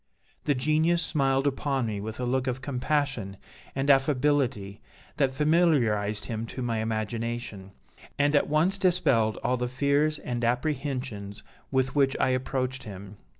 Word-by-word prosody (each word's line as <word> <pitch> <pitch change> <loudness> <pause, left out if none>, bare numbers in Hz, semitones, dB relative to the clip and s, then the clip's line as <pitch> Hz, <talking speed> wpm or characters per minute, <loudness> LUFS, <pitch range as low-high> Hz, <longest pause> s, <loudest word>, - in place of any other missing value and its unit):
The 145 - +2
Genius 155 +6 +2
smiled 135 -4 +1
upon 135 -2 0
me 105 -3 -3
with 110 +2 -6
a 125 - -1
look 130 +1 0
of 130 +1 -2
compassion 135 -7 -1 0.4
and 135 +1 -1
affability 135 -7 +2 0.4
that 135 -3 +2
familiarized 130 -9 +2
him 115 0 -4
to 130 - -5
my 115 -2 -1
imagination, 110 -2 -3 0.5
and 145 +1 +2
at 145 - +2
once 170 +6 +2
dispelled 155 - +2
all 125 - +1
the 125 0 -1
fears 140 +4 +1
and 120 -3 -4
apprehensions 125 -5 -2 0.3
with 130 0 +1
which 135 -2 +2
I - - +3
approached 130 0 -1
him. 100 -3 -9
130 Hz, 145 wpm, -27 LUFS, 115-145 Hz, 0.5 s, I